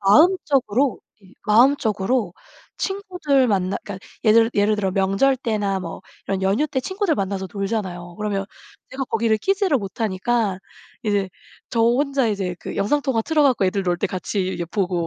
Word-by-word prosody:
마음적으로 275 - +3 0.2
이 190 -1 -20
마음적으로 220 -3 +2 0.4
친구들 360 - 0
만나 190 -1 0
그러니까 195 -2 -8 0.2
예를 225 +1 +5
예를 210 +1 +2
들어 195 -2 0
명절 195 +8 +2
때나 210 -6 -1
뭐 175 0 -7 0.2
이런 195 -1 -2
연휴 200 +10 +2
때 270 -3 -2
친구들 375 +4 -1
만나서 195 -4 -3
놀잖아요. 190 -4 -4
그러면 205 -2 -2 0.5
제가 270 +1 -3
거기를 225 -1 +1
끼지를 385 - +1
못하니까 205 0 -1 0.5
이제 205 -3 +1 0.4
저 230 - 0
혼자 265 +2 +2
이제 195 -4 -2
그 - - -6
영상통화 260 +3 +1
틀어 305 +4 +2
갖고 255 -8 +3
애들 195 +1 0
놀 175 -1 +1
때 205 - 0
같이 185 0 -3
예 - - 0
보고 180 -3 -1
210 Hz, 345 characters per minute, -22 LUFS, 195-265 Hz, 0.5 s, 예를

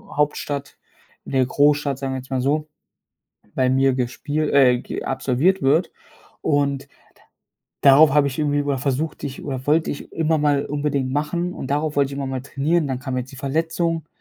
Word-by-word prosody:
Hauptstadt, 145 -1 -2 0.5
in - - -8
der 130 -1 +3
Großstadt, 145 +1 +2
sagen 135 -1 -3
wir - - -2
jetzt 130 - -13
mal 130 - 0
so, 150 +3 0 0.9
bei 130 -1 +2
mir 135 0 +3
gespiel 145 +5 -2
äh, 125 -3 +5
ge - - -6
absolviert 140 +9 +1
wird 155 +6 +2 0.5
und 140 -2 0 0.9
da 140 - +7
darauf 145 +1 +6
habe 145 -1 +4
ich 135 +2 -5
irgendwie 145 -1 +1
b - - -7
oder 140 -2 0
versuchte 145 +3 -2
ich 135 - -9
oder 130 -2 -5
wollte 155 +2 +2
ich 145 - -8
immer 160 -1 +1
mal 145 -1 +2
unbedingt 145 -2 -1
machen 170 +5 -1
und - - -6
darauf 150 +1 -1
wollte 140 -1 +2
ich 140 - -6
immer 140 - -3
mal 130 -1 -3
trainieren. 150 +4 0
Dann 130 - -2
kam 130 -1 -4
jetzt 130 +2 -4
die - - -11
Verletzung, 160 +3 -1
140 Hz, 190 wpm, -22 LUFS, 135-150 Hz, 0.9 s, da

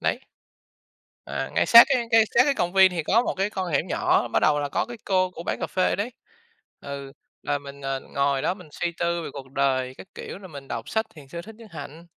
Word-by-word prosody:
đấy. - - 0 1.1
À, - - -4
ngay - - +3
sát 235 0 +11
cái 255 -4 +1
cái 225 -1 +7
sát 235 - +8
cái 285 - +3
công 175 -8 -1
viên 190 -1 +7
thì 170 -3 -2
có 220 +8 +3
một - - -2
cái 195 +2 +1
con 185 -4 -3
hẻm 145 - +1
nhỏ, - - +2
bắt - - +1
đầu 145 -1 +3
là 145 - -2
có - - 0
cái 240 0 -9
cô, 185 -1 +2
cô 170 - -8
bán - - -2
cà - - -2
phê 185 - +1
ở - - 0
đấy, 210 +5 -3 0.7
ừ, 140 -1 -7 0.3
là 145 - 0
mình, 140 0 -11
ờ, 135 0 -2
ngồi 140 0 -1
đó 180 - +1
mình 180 -5 -14
suy 175 +3 -2
tư 170 0 0
về - - -5
cuộc 135 -2 -9
đời 130 -2 0
các - - -11
kiểu, - - -7
rồi 190 -2 -11
mình 140 -3 -10
đọc 115 -1 -5
sách 220 0 0
Thiền 145 -3 -13
sư 170 +5 -7
Thích 220 +5 -12
Nhất 225 0 -14
Hạnh. 155 +1 -9
170 Hz, 255 wpm, -25 LUFS, 140-195 Hz, 1.1 s, sát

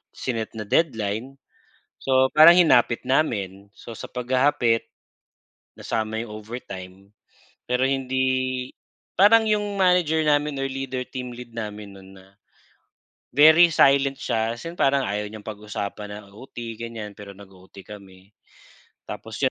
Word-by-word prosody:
sinet 115 -3 -4
na 110 - -5
deadline, 115 -3 -1 0.6
so 130 0 +2
parang 155 +4 +8
hinapit 125 -9 +4
namin. 100 -8 -1
So, 115 +2 -11
sa - - -7
paghahapit, 125 -2 +1 0.9
nasama 110 0 -3
'yong 115 - -8
overtime, 100 -3 -9 0.6
pero 125 +2 0
hindi, 130 -1 -1 0.5
parang 220 +3 +5
'yong 205 -2 -1
manager 180 -4 +3
namin 145 -1 +1
or 135 - -1
leader, 130 -1 -5
team 125 -2 -6
lead 120 -1 -11
namin 105 -2 -6
no'n 95 0 -15
na, 95 - -19 1.1
very 160 +3 +7
silent 140 -2 +4
siya, 115 +1 -1
as 120 - -11
in 170 - -10
parang 135 0 +2
ayaw 105 -2 -3
niyang 105 0 -11
pag-usapan 105 -1 -6
ang 105 -1 -12
OT, 115 +6 -13 0.2
ganyan, 115 -2 -7
pero 100 -1 -10
nag-o-OT 95 -1 -15
kami. 95 -2 -14 0.8
Tapos - - -8
'yon, - - +3
120 Hz, 130 wpm, -23 LUFS, 105-135 Hz, 1.1 s, parang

